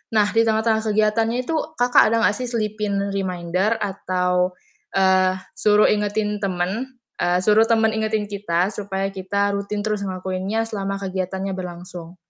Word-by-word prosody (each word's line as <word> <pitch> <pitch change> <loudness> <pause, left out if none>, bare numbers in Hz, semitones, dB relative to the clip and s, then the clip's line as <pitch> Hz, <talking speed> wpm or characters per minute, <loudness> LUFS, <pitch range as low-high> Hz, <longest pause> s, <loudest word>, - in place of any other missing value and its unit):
Nah, 215 - +6
di 225 0 +3
tengah-tengah 220 0 +2
kegiatannya 215 +2 +2
itu, 250 - -5 0.2
Kakak 245 -2 +5
ada 230 0 +1
gak 210 - +3
sih 250 - -3
selipin 210 -3 -2
reminder 185 +2 -1
atau, 180 -2 0 0.4
eee, 185 -1 +4 0.2
suruh 210 0 +4
ingetin 210 0 -1
temen 195 +7 -2 0.3
eee, 175 0 +2
suruh 215 +1 +6
temen 225 -1 +3
ingetin 220 -1 0
kita, 195 -2 -1
supaya 195 -1 -3
kita 200 +1 -1
rutin 200 +1 -3
terus 215 -1 -1
ngelakuinnya 190 +3 -2
selama 195 -3 -3
kegiatannya 190 0 -3
berlangsung? 175 -1 -8
200 Hz, 140 wpm, -22 LUFS, 185-215 Hz, 0.4 s, Nah